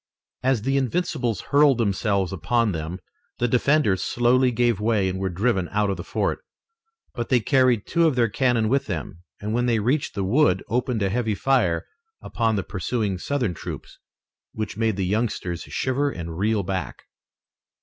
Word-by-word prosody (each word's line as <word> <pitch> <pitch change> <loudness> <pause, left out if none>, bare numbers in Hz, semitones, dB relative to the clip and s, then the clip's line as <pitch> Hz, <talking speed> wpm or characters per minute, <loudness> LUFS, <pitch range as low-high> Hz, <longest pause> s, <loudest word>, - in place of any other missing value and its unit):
As 130 -4 +1
the 135 +2 +1
Invincibles 130 - -1
hurled 145 -2 +5
themselves 100 -3 0
upon 110 +6 +1
them 80 +1 -4 0.4
the 120 - +1
defenders 125 -5 +2
slowly 125 +2 +2
gave 120 -3 +1
way 105 -3 +1
and 95 0 -3
were 95 0 -1
driven 95 0 0
out 105 -1 +1
of 95 - -3
the - - -6
fort. - - -2 0.7
But 120 - -4
they 125 - +4
carried 125 -2 +2
two 170 -1 +2
of 150 - +1
their 120 -2 +3
cannon 115 0 +1
with 135 +4 +1
them, 85 -1 -5 0.2
and 105 +1 -3
when 120 +1 +1
they 115 -2 +2
reached 125 +7 0
the 100 - -1
wood 100 -2 +2
opened 120 -2 -1
a 95 - +1
heavy 110 0 0
fire 100 -11 +1 0.3
upon 115 -1 -1
the 100 - -1
pursuing 100 0 -2
Southern 125 -5 -1
troops, - - -8 0.5
which 110 -1 -4
made 110 -1 0
the 95 -1 -1
youngsters 95 -4 -1
shiver 135 +2 -1
and 85 -8 -6
reel 105 +3 +1
back. 95 -3 -4
110 Hz, 170 wpm, -24 LUFS, 95-125 Hz, 0.7 s, hurled